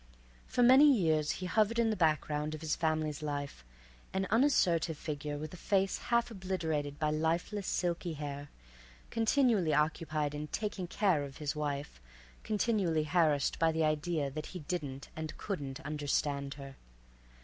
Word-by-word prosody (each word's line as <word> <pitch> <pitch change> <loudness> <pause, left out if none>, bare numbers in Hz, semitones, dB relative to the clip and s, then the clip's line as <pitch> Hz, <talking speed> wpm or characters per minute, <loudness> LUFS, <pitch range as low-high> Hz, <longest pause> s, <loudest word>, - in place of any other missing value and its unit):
For 245 - +2
many 265 +4 +8
years 160 - +2
he 185 - -5
hovered 215 +4 +2
in 230 -1 +3
the - - 0
background 155 -3 0
of 155 - -10
his 160 -1 0
family's 155 -2 -1
life, 145 - -4 0.5
an 190 0 0
unassertive 180 - +3
figure 145 -1 -4
with 155 +2 -6
a - - -8
face 195 +1 +1
half 235 0 +2
obliterated 160 -8 -2
by 155 0 0
lifeless, 170 +6 -1
silky 175 -1 -1
hair, 145 -1 -6 0.6
continually 225 - +3
occupied 155 -1 0
in 150 +1 -4
"taking 205 -1 -3
care" 180 -5 +2
of 140 -1 -8
his 150 -1 -3
wife, 145 - -4 0.4
continually 205 -7 +1
harassed 155 -3 +2
by 165 -1 +4
the 160 0 0
idea 155 -1 0
that 155 +2 -5
he 180 - -7
didn't 145 -4 -4
and 155 0 -5
couldn't 145 -9 -4
understand 145 -2 -1
her. 135 -1 -10
155 Hz, 150 wpm, -32 LUFS, 150-190 Hz, 0.6 s, many